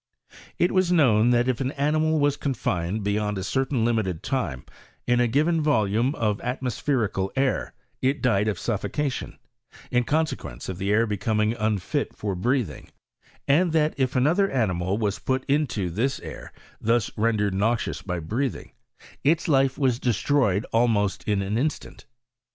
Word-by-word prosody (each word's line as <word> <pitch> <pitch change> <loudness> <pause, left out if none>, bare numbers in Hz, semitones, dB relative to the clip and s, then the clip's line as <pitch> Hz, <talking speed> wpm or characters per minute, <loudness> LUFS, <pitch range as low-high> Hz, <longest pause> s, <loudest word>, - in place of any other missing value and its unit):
It 175 - +2
was 185 -2 +2
known, 120 -9 +4
that 120 0 +3
if 130 -1 0
an 135 +2 -1
animal 155 +2 +1
was 145 -1 +2
confined 105 - -2
be 100 - 0
yond 105 0 -1
a 95 - -3
certain 130 +1 0
limited 110 -8 -1
time 80 - -2 0.4
in 120 0 +2
a 120 - +3
given 155 +7 +2
volume 120 -2 +1
of 105 -2 -1
atmospherical 125 -5 -1
air, 135 -2 0 0.3
it 135 +3 +1
died 105 -4 +2
of 105 -4 -1
suffocation, 125 - -3 0.5
in 125 -1 +3
conse 155 +5 +1
quence - - -9
of 95 -1 -5
the 100 +1 -1
air 110 +2 +4
becoming 105 +1 0
unfit 110 -4 -1
for 105 -2 -2
breathing; 115 - -1 0.6
and 160 +4 +3
that 155 -1 +2
if 130 -1 -1
another 165 +10 +3
animal 95 -6 0
was 105 -1 -1
put 130 +2 -1
into 130 - 0
this 120 +10 -1
air, - - -9 0.3
thai 115 +2 +4 0.2
rendered 105 -2 +1
noxious 105 -1 0
by 90 -1 -3
breathing, 115 - -3 0.5
its 160 +4 +2
life 135 -3 +3
was 130 -4 +1
d& 125 - +1
stroyed 110 -4 +1
almost 110 -4 +2
in 100 -2 +1
an 105 +4 -1
instant. 155 +4 -4
120 Hz, 160 wpm, -25 LUFS, 105-140 Hz, 0.6 s, known